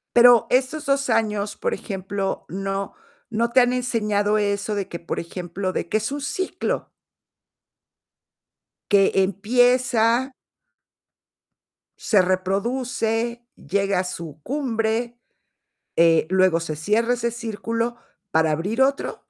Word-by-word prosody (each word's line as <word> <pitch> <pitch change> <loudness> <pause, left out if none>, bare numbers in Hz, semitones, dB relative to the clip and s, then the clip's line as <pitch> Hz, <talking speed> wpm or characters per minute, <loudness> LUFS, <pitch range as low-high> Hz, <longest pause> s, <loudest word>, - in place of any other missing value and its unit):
Pero 240 -1 +7
estos 265 +4 0
2 275 -2 +1
años, 210 -2 0
por - - -1
ejemplo, 195 -1 -4
no 195 +1 -4 0.4
no 230 +2 0
te 255 - +5
han 245 0 +3
enseñado 215 -4 0
eso 205 0 -1
de 195 -2 -2
que, 170 - -7
por 170 - -4
ejemplo, 180 +2 -4
de 170 - -3
que - - 0
es 220 +5 -1
un 290 - -3
ciclo 370 +7 -3 2.0
que 200 -1 +5
empieza 240 +5 +2 1.7
se 205 -5 +3
reproduce, 225 +5 -1
llega 195 -1 0
a 185 - -2
su 165 -4 -7
cumbre, 240 -3 -2 0.8
eh, 165 -1 +4
luego 185 -3 +3
se 160 -2 -4
cierra 215 +10 +1
ese 235 -1 -1
círculo 230 +1 -3 0.4
para 160 0 +3
abrir 200 - -1
otro. 275 +1 +1
215 Hz, 120 wpm, -23 LUFS, 190-240 Hz, 2.0 s, Pero